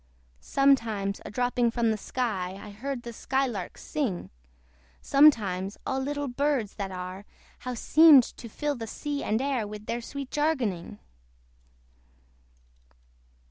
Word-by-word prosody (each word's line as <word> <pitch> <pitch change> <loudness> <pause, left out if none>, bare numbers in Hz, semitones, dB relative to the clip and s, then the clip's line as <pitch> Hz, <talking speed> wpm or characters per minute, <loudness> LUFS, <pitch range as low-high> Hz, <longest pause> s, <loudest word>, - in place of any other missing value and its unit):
Sometimes 225 - +1
a - - -5
dropping 245 +1 +1
from 230 -1 +1
the - - +1
sky 200 -5 -2
I 205 +1 -9
heard 245 +4 -5
the 235 - -7
sky 265 +4 0
lark 205 -8 -5
sing; 255 -13 -3 0.7
Sometimes 205 -10 +3
all 265 - -1
little 285 +1 -2
birds 260 -4 0
that 200 -2 -3
are, 185 +1 -6 0.4
How 250 - -4
they - - -5
seemed 295 +2 +7
to 235 - -9
fill 295 +6 -2
the 230 -4 -6
sea 290 +5 -4
and 220 +1 +1
air 260 -5 -1
With 210 0 -8
their 235 +2 -3
sweet 275 +2 -7
jargoning! 265 - -1
240 Hz, 140 wpm, -27 LUFS, 205-275 Hz, 0.7 s, seemed